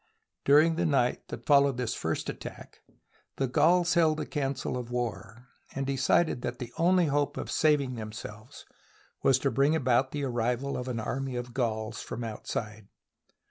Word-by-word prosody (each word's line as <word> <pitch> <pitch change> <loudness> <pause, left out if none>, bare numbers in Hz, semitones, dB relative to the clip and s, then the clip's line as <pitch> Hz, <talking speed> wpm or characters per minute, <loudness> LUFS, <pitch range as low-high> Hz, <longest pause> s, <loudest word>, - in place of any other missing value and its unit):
During 155 +3 +5
the 175 - +1
night 135 -5 +1
that - - -8
followed 140 -3 +4
this 125 -3 -1
first - - -3
attack, - - -8 0.5
the 135 - 0
Gauls 175 +7 +3
held 160 -3 +3
a - - -2
council 135 -3 -2
of 125 -1 -5
war, 120 0 -5 0.3
and 135 0 -2
decided 135 +1 +2
that 120 0 -4
the 120 -1 -7
only 180 +1 +4
hope 145 -1 0
of - - -4
saving 145 -4 +2
themselves 110 +1 -8 0.6
was 135 - +4
to 135 +1 0
bring 140 +3 +3
about 130 -2 +2
the 145 -1 -3
arrival 125 +2 -1
of 125 - -4
an 120 -3 -2
army 130 +3 -3
of 120 0 -5
Gauls 110 -3 -2
from 120 - -6
outside. 110 -1 -5
130 Hz, 165 wpm, -29 LUFS, 120-145 Hz, 0.6 s, During